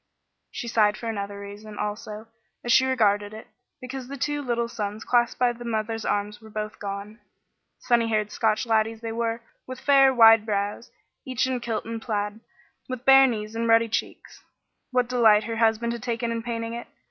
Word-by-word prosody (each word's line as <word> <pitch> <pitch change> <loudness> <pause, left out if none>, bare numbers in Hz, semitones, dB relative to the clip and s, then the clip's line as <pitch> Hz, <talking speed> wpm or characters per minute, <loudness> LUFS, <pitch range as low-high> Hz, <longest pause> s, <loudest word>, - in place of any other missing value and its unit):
She 240 - -6
sighed 210 -2 +2
for 230 - -6
another 200 -2 -4
reason, 205 +1 -10
also, 210 +1 -5 0.4
as 240 - -1
she 260 +2 +5
regarded 205 -4 +1
it: 220 - -10 0.3
because 255 0 -7
the 280 +1 -7
two 290 +2 -1
little 235 -3 -1
sons 210 -2 -5
clasped 240 -1 +2
by 245 -1 +3
the 240 0 -10
mother's 225 -1 -3
arms 205 +1 -2
were 220 - -13
both 215 0 -5
gone. 200 +2 -6 0.6
Sunny 235 -2 +2
haired 215 -2 0
Scotch 215 -1 +1
laddies 225 0 +1
they 225 -1 -4
were, 230 0 -2 0.2
with 255 0 -7
fair, 275 -1 +5
wide 225 -3 +7
brows, 205 +1 -3 0.3
each 260 0 -1
in 260 -1 -1
kilt 235 -2 -3
and 225 0 -5
plaid, 210 -1 -3 0.5
with 255 0 -6
bare 270 0 +8
knees 215 -3 -4
and 230 0 -1
ruddy 230 0 +4
cheeks. - - -5 0.5
What 250 -2 +1
delight 225 -4 +4
her 225 +1 -4
husband 225 +1 +2
had 235 - -6
taken 235 -1 -2
in 230 0 -2
painting 230 -1 -4
it! 235 - -6
225 Hz, 185 wpm, -25 LUFS, 215-240 Hz, 0.6 s, bare